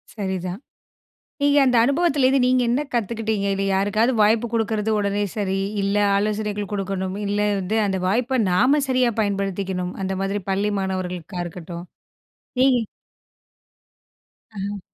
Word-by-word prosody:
சரிதான். 190 Hz, -2 st, -3 dB, 0.8 s
நீங்க 285 Hz, 0 st, +4 dB
அந்த 250 Hz, -2 st, +3 dB
அனுபவத்திலிருந்து 275 Hz, -1 st, +3 dB
நீங்க 255 Hz, 0 st, +3 dB
என்ன 250 Hz, +4 st, +1 dB
கத்துக்கிட்டீங்க? 220 Hz, -2 st, -1 dB
இதுல. 195 Hz, 0 st, -1 dB
யாருக்காவது 205 Hz, +5 st, +2 dB
வாய்ப்பு 220 Hz, +3 st, +3 dB
குடுக்கிறது 220 Hz, -1 st, 0 dB
உடனே 205 Hz, 0 st, 0 dB
சரி. 195 Hz, -2 st, -1 dB, 0.2 s
இல்லை 200 Hz, +1 st, +1 dB
ஆலோசனைகள் 210 Hz, 0 st, -2 dB
குடுக்கணும். 195 Hz, -1 st, -2 dB
இல்லை 205 Hz, +1 st, +1 dB
வந்து 195 Hz, +4 st, -1 dB
அந்த 190 Hz, -1 st, -1 dB
வாய்ப்ப 250 Hz, +6 st, +1 dB
நாம 260 Hz, +11 st, +4 dB
சரியா 255 Hz, -2 st, +2 dB
பயன்படுத்திக்கணும். 195 Hz, -3 st, -2 dB
அந்த 190 Hz, 0 st, -2 dB
மாதிரி 195 Hz, +1 st, -1 dB
பள்ளி 200 Hz, +2 st, 0 dB
மாணவர்களுக்கா 185 Hz, -2 st, -4 dB
இருக்கட்டும், 175 Hz, 0 st, -8 dB, 0.8 s
நீங்க 255 Hz, -3 st, +4 dB, 1.7 s
அஹ்ம். 200 Hz, +1 st, -4 dB
205 Hz, 120 wpm, -22 LUFS, 190-235 Hz, 1.7 s, நீங்க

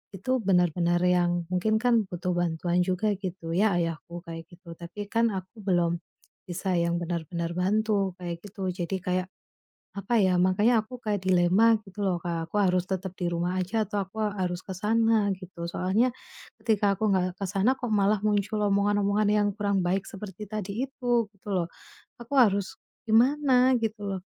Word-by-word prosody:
itu 195 Hz, +7 st, -4 dB
benar-benar 175 Hz, -2 st, +2 dB
yang 175 Hz, -1 st, +2 dB
mungkin 215 Hz, +4 st, +1 dB
kan 235 Hz, -3 st, +4 dB
butuh 180 Hz, 0 st, -3 dB
bantuan 175 Hz, 0 st, 0 dB
juga 185 Hz, +4 st, 0 dB
gitu 185 Hz, -4 st, -6 dB
ya, 205 Hz, +3 st, +3 dB
ayahku 170 Hz, 0 st, -3 dB
kayak 165 Hz, -1 st, -7 dB
gitu. 175 Hz, -1 st, -12 dB
Tapi 180 Hz, +5 st, -8 dB
kan 230 Hz, 0 st, +3 dB
aku 190 Hz, +4 st, -8 dB
belum 175 Hz, -3 st, +1 dB, 0.5 s
bisa 185 Hz, +1 st, -2 dB
yang 170 Hz, 0 st, +1 dB
benar-benar 170 Hz, 0 st, -3 dB
bantu, 200 Hz, 0 st, +1 dB
kayak 170 Hz, -1 st, -6 dB
gitu, 200 Hz, -2 st, -5 dB
jadi 180 Hz, +1 st, -3 dB
kayak, 180 Hz, +1 st, -1 dB, 0.7 s
apa 200 Hz, +4 st, -1 dB
ya, 185 Hz, -2 st, +3 dB
makanya 185 Hz, +6 st, +3 dB
aku 250 Hz, +2 st, -10 dB
kayak 205 Hz, -4 st, -2 dB
dilema 185 Hz, +5 st, +4 dB
gitu 205 Hz, 0 st, -9 dB
loh 185 Hz, -2 st, +1 dB
Kak, 170 Hz, -2 st, -2 dB
aku -, -, -9 dB
harus 180 Hz, -2 st, +2 dB
tetap 190 Hz, -1 st, -4 dB
di 180 Hz, -, -2 dB
rumah 175 Hz, +2 st, -1 dB
aja 210 Hz, +4 st, -1 dB
atau 210 Hz, -, -2 dB
aku 195 Hz, +4 st, -17 dB, 0.2 s
harus 180 Hz, -1 st, -2 dB
ke 190 Hz, -, -4 dB
sana 220 Hz, 0 st, +2 dB
gitu, 185 Hz, -2 st, -8 dB
soalnya 210 Hz, +9 st, +1 dB, 0.5 s
ketika 210 Hz, -3 st, +2 dB
aku 215 Hz, +2 st, +1 dB
gak 185 Hz, -1 st, 0 dB
ke 200 Hz, -, -2 dB
sana, 200 Hz, +6 st, +2 dB
kok 245 Hz, -2 st, -4 dB
malah 205 Hz, 0 st, +2 dB
muncul 210 Hz, 0 st, +1 dB
omongan-omongan 205 Hz, +1 st, +2 dB
yang 205 Hz, 0 st, +3 dB
kurang 200 Hz, -2 st, +1 dB
baik 190 Hz, +2 st, 0 dB
seperti 200 Hz, +1 st, -8 dB
tadi 215 Hz, +3 st, -3 dB
itu, 245 Hz, -3 st, 0 dB
gitu 200 Hz, +1 st, -21 dB
loh. 175 Hz, -2 st, 0 dB, 0.5 s
Aku 235 Hz, +4 st, -8 dB
harus 200 Hz, -6 st, +3 dB, 0.3 s
gimana 255 Hz, +3 st, +4 dB
gitu 220 Hz, -1 st, -2 dB
loh? 195 Hz, -2 st, -3 dB
190 Hz, 170 wpm, -27 LUFS, 175-215 Hz, 0.7 s, kan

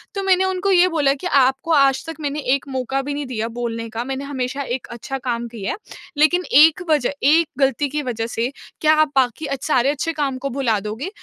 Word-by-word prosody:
तो 395 Hz, -, -1 dB
मैंने 380 Hz, -1 st, +3 dB
उनको 380 Hz, +1 st, 0 dB
ये 365 Hz, -1 st, +5 dB
बोला 295 Hz, -5 st, +2 dB
कि, 285 Hz, +6 st, -5 dB
"आपको 270 Hz, +1 st, +2 dB
आज 275 Hz, -3 st, +3 dB
तक 325 Hz, 0 st, -6 dB
मैंने 290 Hz, 0 st, -2 dB, 0.2 s
एक 280 Hz, -, -7 dB
मौका 265 Hz, +1 st, -2 dB
भी 285 Hz, +2 st, -4 dB
नहीं 290 Hz, 0 st, -4 dB
दिया 225 Hz, -4 st, -3 dB
बोलने 230 Hz, -1 st, -3 dB
का। 225 Hz, +2 st, -4 dB
मैंने 270 Hz, +2 st, -4 dB
हमेशा 270 Hz, -1 st, -3 dB
एक 245 Hz, +1 st, -3 dB
अच्छा 240 Hz, +3 st, -5 dB
काम 240 Hz, -2 st, -3 dB
किया 220 Hz, -4 st, -5 dB
है। -, -, -4 dB, 0.4 s
लेकिन 335 Hz, +5 st, +3 dB, 0.2 s
एक 315 Hz, +3 st, +6 dB
वज़ह 295 Hz, -5 st, +2 dB
एक 315 Hz, +4 st, +4 dB
गलती 275 Hz, +1 st, +2 dB
की 300 Hz, +2 st, -2 dB
वज़ह 230 Hz, -3 st, -3 dB
से 235 Hz, +1 st, -2 dB, 0.3 s
क्या 310 Hz, 0 st, +5 dB
आप 310 Hz, -2 st, +1 dB
बाकी 260 Hz, +3 st, +1 dB
अच्छ 275 Hz, -3 st, -4 dB
सारे 265 Hz, -3 st, +3 dB
अच्छे 295 Hz, +3 st, -1 dB
काम 280 Hz, -4 st, -2 dB
को 275 Hz, +2 st, -4 dB
भुला 240 Hz, -5 st, 0 dB
दोगे?" 230 Hz, -, -4 dB
275 Hz, 225 wpm, -20 LUFS, 250-305 Hz, 0.4 s, एक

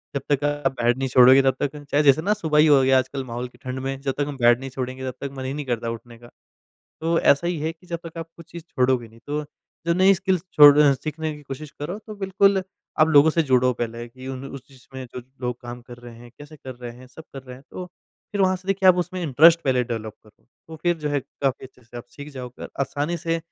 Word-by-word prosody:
जब 140 Hz, -, -1 dB
तक 145 Hz, 0 st, +1 dB
आप 145 Hz, -1 st, 0 dB
बेड 120 Hz, +2 st, +2 dB
नहीं 135 Hz, 0 st, -1 dB
छोड़ोगे, 130 Hz, +2 st, +7 dB
तब 135 Hz, -1 st, +2 dB
तक 145 Hz, +1 st, -2 dB, 0.2 s
चाहे 145 Hz, +1 st, +3 dB
जैसे 145 Hz, +2 st, +5 dB
ना, 205 Hz, +4 st, +1 dB
सुबह 160 Hz, -7 st, 0 dB
ही 155 Hz, -, +6 dB
हो 140 Hz, -3 st, +6 dB
गया, 130 Hz, 0 st, +4 dB
आजकल 130 Hz, +1 st, -4 dB
माहौल 120 Hz, +1 st, -5 dB
की -, -, -21 dB
ठंड 130 Hz, 0 st, -4 dB
में, 135 Hz, +1 st, -4 dB
जब 135 Hz, -1 st, -2 dB
तक 145 Hz, -, 0 dB
हम 145 Hz, -2 st, -6 dB
बेड 120 Hz, 0 st, +4 dB
नहीं 135 Hz, 0 st, -7 dB
छोड़ेंगे, 130 Hz, 0 st, -5 dB
तब -, -, -20 dB
तक 140 Hz, -1 st, -4 dB
मन 130 Hz, -, -5 dB
ही 130 Hz, -, -3 dB
नहीं 145 Hz, 0 st, -5 dB
करता 120 Hz, -2 st, -2 dB
उठने 115 Hz, 0 st, -10 dB
का। 120 Hz, 0 st, -16 dB, 0.7 s
तो 165 Hz, +1 st, +1 dB
ऐसा 140 Hz, +5 st, +3 dB
ही 175 Hz, -3 st, -1 dB
है 160 Hz, +1 st, -2 dB
कि 180 Hz, +2 st, -24 dB
जब 170 Hz, -2 st, -4 dB
तक 165 Hz, -, -11 dB
आप 165 Hz, -, -6 dB
कुछ 170 Hz, -1 st, -15 dB
चीज़ 170 Hz, -1 st, -8 dB
छोड़ोगे 125 Hz, -3 st, 0 dB
नहीं, 115 Hz, +1 st, -19 dB
तो 150 Hz, +1 st, -2 dB, 0.4 s
जो 170 Hz, -, +2 dB
नई 190 Hz, +2 st, +5 dB
स्किल्स 190 Hz, -2 st, -1 dB
छोड़ 145 Hz, -1 st, +8 dB
अ, 145 Hz, -2 st, +6 dB
सीखने 155 Hz, +3 st, -4 dB
की 150 Hz, -, -14 dB
कोशिश 140 Hz, +2 st, -8 dB
करो, 175 Hz, +8 st, -4 dB
तो 215 Hz, 0 st, -10 dB
बिल्कुल, 195 Hz, 0 st, +2 dB, 0.4 s
आप 155 Hz, +1 st, +5 dB
लोगों 155 Hz, +1 st, +6 dB
से 165 Hz, +1 st, +1 dB
जुड़ो 130 Hz, -2 st, +3 dB
पहले 115 Hz, 0 st, -5 dB
कि 130 Hz, +2 st, -13 dB
उन 135 Hz, 0 st, -6 dB
उस 135 Hz, -1 st, -10 dB
चीज़ 130 Hz, -2 st, -20 dB
में 130 Hz, -, -6 dB
जो 125 Hz, -, -6 dB, 0.2 s
लोग 125 Hz, -1 st, -4 dB
काम 120 Hz, 0 st, -9 dB
कर 120 Hz, 0 st, -12 dB
रहे 120 Hz, -1 st, -12 dB
हैं, 120 Hz, 0 st, -14 dB
कैसे 145 Hz, +1 st, -12 dB
कर 130 Hz, -2 st, -9 dB
रहे 120 Hz, -1 st, -8 dB
हैं, 130 Hz, 0 st, -14 dB
सब 160 Hz, +5 st, -14 dB
कर 135 Hz, -1 st, -8 dB
रहे 125 Hz, -1 st, -11 dB
हैं। 135 Hz, -, -18 dB
तो 180 Hz, -, -7 dB, 0.5 s
फिर 205 Hz, -, -2 dB
वहाँ 185 Hz, -1 st, +3 dB
से 185 Hz, +2 st, -16 dB
देखिए, 195 Hz, -1 st, +3 dB
आप 180 Hz, -, +6 dB
उसमें 180 Hz, +1 st, -7 dB
इंटरेस्ट 165 Hz, +3 st, +5 dB
पहले 125 Hz, -2 st, +2 dB
डेवलप 110 Hz, -2 st, -5 dB
करो। 110 Hz, -, -24 dB, 0.2 s
तो 160 Hz, -, -9 dB
फिर 175 Hz, -1 st, +1 dB
जो 150 Hz, -1 st, -3 dB
है, 145 Hz, -1 st, 0 dB
काफ़ी 130 Hz, 0 st, -4 dB
अच्छे 125 Hz, -1 st, -24 dB
से 120 Hz, +1 st, -13 dB
आप 120 Hz, -, -8 dB
सीख 145 Hz, +1 st, -10 dB
जाओगे 125 Hz, -2 st, -9 dB
और -, -, -7 dB
आसानी 145 Hz, +5 st, -2 dB
से 165 Hz, 0 st, -2 dB
140 Hz, 270 wpm, -23 LUFS, 125-160 Hz, 0.7 s, छोड़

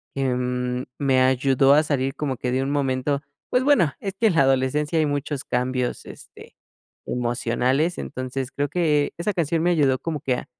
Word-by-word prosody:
que, 135 Hz, -, -1 dB
mm, 125 Hz, 0 st, -2 dB, 0.2 s
me 135 Hz, -2 st, +3 dB
ayudó 130 Hz, +1 st, +4 dB
a 150 Hz, +2 st, +5 dB
salir 135 Hz, -3 st, -1 dB
como 140 Hz, -3 st, -2 dB
que 125 Hz, -, -2 dB
de 130 Hz, +1 st, 0 dB
un 140 Hz, -, -2 dB
momento 140 Hz, 0 st, 0 dB, 0.3 s
pues, 250 Hz, -, +2 dB
bueno, 255 Hz, -, +3 dB
es 195 Hz, -1 st, -4 dB
que 225 Hz, -, +4 dB
en 180 Hz, -, +1 dB
la 160 Hz, -, +5 dB
adolescencia 135 Hz, +4 st, +1 dB
hay 155 Hz, -, +3 dB
muchos 145 Hz, -1 st, -3 dB
cambios, 125 Hz, 0 st, -2 dB
este, -, -, -13 dB, 0.5 s
emocionales, 125 Hz, +6 st, 0 dB
entonces, 130 Hz, 0 st, -5 dB
creo 145 Hz, 0 st, -1 dB
que 150 Hz, -3 st, +1 dB
esa 190 Hz, +5 st, -1 dB
canción 165 Hz, -2 st, 0 dB
me 175 Hz, -, +2 dB
ayudó 140 Hz, -6 st, +2 dB
como 160 Hz, 0 st, -4 dB
que 130 Hz, -4 st, 0 dB
a -, -, -7 dB
135 Hz, 185 wpm, -23 LUFS, 130-150 Hz, 0.5 s, a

